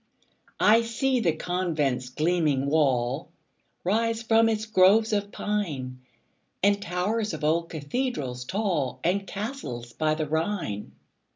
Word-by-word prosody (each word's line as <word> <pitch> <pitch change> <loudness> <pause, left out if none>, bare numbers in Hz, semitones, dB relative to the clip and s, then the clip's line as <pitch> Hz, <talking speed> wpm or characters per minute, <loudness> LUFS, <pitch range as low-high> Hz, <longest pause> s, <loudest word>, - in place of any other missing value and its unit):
I 225 +2 +6
see 250 +3 0
the 170 -8 +2
convent's 155 -8 -1
gleaming 155 -2 +1
wall 140 -2 +1 0.5
Rise 225 +4 +1
from 225 0 +4
its 215 -1 -1
groves 215 +2 +4
of 205 0 -1
pine, 145 -12 -3 0.6
And 200 0 +3
towers 205 +5 -1
of - - -9
old 165 +2 +1
cathedrals 145 - -3
tall, 180 - -1
And 195 +3 0
castles 165 - -5
by 155 -1 +1
the 155 0 -2
Rhine. 160 - -2
180 Hz, 120 wpm, -26 LUFS, 145-215 Hz, 0.6 s, I